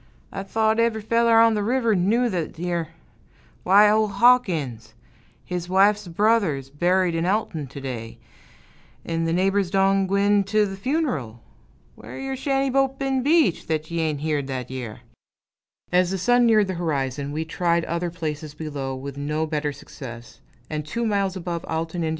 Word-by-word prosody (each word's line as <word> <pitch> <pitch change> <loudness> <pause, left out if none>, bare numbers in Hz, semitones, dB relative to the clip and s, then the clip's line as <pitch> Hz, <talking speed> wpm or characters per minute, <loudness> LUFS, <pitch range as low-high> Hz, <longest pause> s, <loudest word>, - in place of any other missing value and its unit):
I - - -5
thote 220 +3 +1
ev'ry 230 -1 +2
feller 230 +1 +3
on 230 0 +5
th' 210 - 0
river 230 +1 +1
knew 210 +7 +2
thet 175 -7 -3
yere 170 -1 -2 0.7
why, 200 +3 +6
ol' 215 +1 +3
Hawkins, 175 - +2 0.5
his 180 -1 -4
wife's 200 +2 +3
brother's 170 - +1
buried 180 +4 +1
in 165 +1 -1
Alton 185 -7 -1
to 140 +2 -9
day, 120 -4 -6 0.9
'n' 165 0 -1
th' 165 - 0
neighbors 195 +1 +1
done 195 0 +2
gwine 200 +1 +3
t' 210 +2 +2
th' 195 -1 -5
fun'ral. 170 - -2 0.5
Whar - - -10
your 270 0 -4
shanty 270 0 0
boat 270 0 +1
been 270 -1 0
beached, 290 - +2
thet 155 0 -2
ye 170 - -2
ain' 155 -2 0
heared 150 -2 -2
thet 130 -2 -5
yere?" 125 -4 -6 0.9
As 180 0 +3
the 195 - -2
sun 245 +5 +3
neared 215 -2 +4
the - - -1
horizon, 140 -3 -2
we 155 +2 -3
tried 170 0 0
other 170 +1 -2
places 155 -3 -5
below, 140 -4 -4
with 140 +1 -7
no 150 +2 -1
better 150 -1 -2
success; 120 -4 -11 0.3
and 150 0 -4
two 230 +11 -3
miles 200 -3 0
above 170 -2 -4
Alton, 165 +1 -3
Ind. 160 - 0
180 Hz, 170 wpm, -23 LUFS, 150-215 Hz, 0.9 s, why